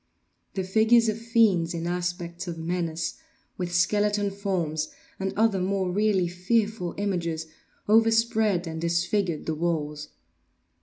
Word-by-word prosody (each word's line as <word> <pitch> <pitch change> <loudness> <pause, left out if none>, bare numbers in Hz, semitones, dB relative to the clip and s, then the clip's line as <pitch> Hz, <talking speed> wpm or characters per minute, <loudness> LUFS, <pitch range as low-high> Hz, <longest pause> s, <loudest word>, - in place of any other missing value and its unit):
The 190 - -1
figures 220 +4 +4
of 215 +1 -2
fiends 215 -8 +2
in 165 0 -3
aspects 175 0 -3
of 170 -1 -4
menace, 165 -1 -2 0.4
with 180 -2 -4
skeleton 205 +3 +2
forms, 175 -6 -2 0.3
and 190 0 -1
other 220 -3 +3
more 190 -1 0
really 200 -2 +2
fearful 195 +1 -1
images, 170 -5 -2 0.4
overspread 220 -3 +3
and 160 -1 -5
disfigured 170 0 0
the 160 - -1
walls. 150 -2 -2
180 Hz, 120 wpm, -26 LUFS, 170-210 Hz, 0.4 s, figures